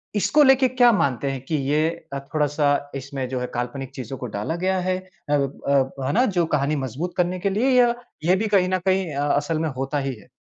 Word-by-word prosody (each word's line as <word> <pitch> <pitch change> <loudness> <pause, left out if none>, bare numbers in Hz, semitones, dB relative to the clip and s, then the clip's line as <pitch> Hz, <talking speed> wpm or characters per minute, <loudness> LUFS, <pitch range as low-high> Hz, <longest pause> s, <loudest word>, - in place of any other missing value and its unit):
इसको 295 +9 +4
लेके 265 -1 +5
क्या 245 -1 +5
मानते 140 - 0
हैं 135 - -5
कि 155 - -2
ये 155 +2 +2 0.2
अ, 140 - -2
थोड़ा-सा 145 -1 +1
इसमें 135 -1 -4
जो 130 -1 -2
है 125 - -3
काल्पनिक 125 +2 -4
चीज़ों 130 0 -6
को 125 - -6
डाला 105 +11 -2
गया 190 0 +2
है, 185 0 0 0.3
अब 140 -2 0
अब 135 -1 +1
है 135 - 0
ना, 250 +3 +4
जो 180 -7 +1
कहानी 145 +1 0
मज़बूत 150 +9 -4
करने 180 +1 0
के 200 +2 0
लिए, 220 +7 +1
या 240 -1 +5 0.3
ये 180 +2 +5
भी 215 +3 -1
कहीं 185 -2 +3
न 185 0 +1
कहीं 190 -4 +1
अ, 145 +1 0
असल 145 +2 0
में 160 0 0
होता 135 +2 -2
ही 135 - -2
है? 105 - -17
150 Hz, 230 wpm, -23 LUFS, 135-185 Hz, 0.3 s, लेके